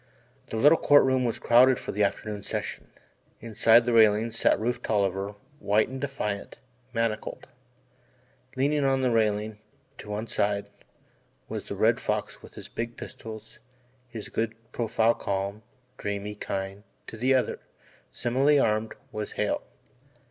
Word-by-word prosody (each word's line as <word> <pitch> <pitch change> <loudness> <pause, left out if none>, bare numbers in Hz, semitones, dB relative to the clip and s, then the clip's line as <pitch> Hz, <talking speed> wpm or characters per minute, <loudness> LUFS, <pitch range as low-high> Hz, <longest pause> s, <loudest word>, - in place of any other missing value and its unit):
The 115 - -4
little 145 +8 +6
Court 145 0 +6
Room 130 -1 +2
was 115 - -1
crowded 125 +2 +5
for - - -5
the 105 - +1
afternoon 105 +1 -2
session. - - -4 0.5
Inside 115 +1 +4
the 120 - +1
railing 110 0 +5
sat 115 -3 +2
Rufe 120 +2 -1
Tolliver, 100 -2 -1 0.2
white 105 +2 +2
and 130 0 -6
defiant 120 -8 -4 0.3
manacled. 115 -2 -2 1.1
Leaning 145 +2 +1
on 135 -1 +2
the 125 - +2
railing, 105 -1 0 0.4
to 105 - -9
one 105 +2 -3
side, 100 -2 -1 0.8
was - - -5
the - - -5
Red - - +3
Fox - - -3
with - - -14
his - - -9
big 115 +1 -5
pistols, 110 -1 -9 0.5
his 115 -4 -8
good 115 0 -2 0.2
profile 115 -1 +2
calm, 100 +1 -3 0.4
dreamy, 100 0 -3
kind 95 0 -5 0.2
to - - -9
the 130 +4 +2
other, 130 - 0 0.5
similarly 135 +5 +2
armed, 110 -3 +1 0.2
was 105 -1 -5
Hale. - - -1
110 Hz, 140 wpm, -27 LUFS, 105-125 Hz, 1.1 s, little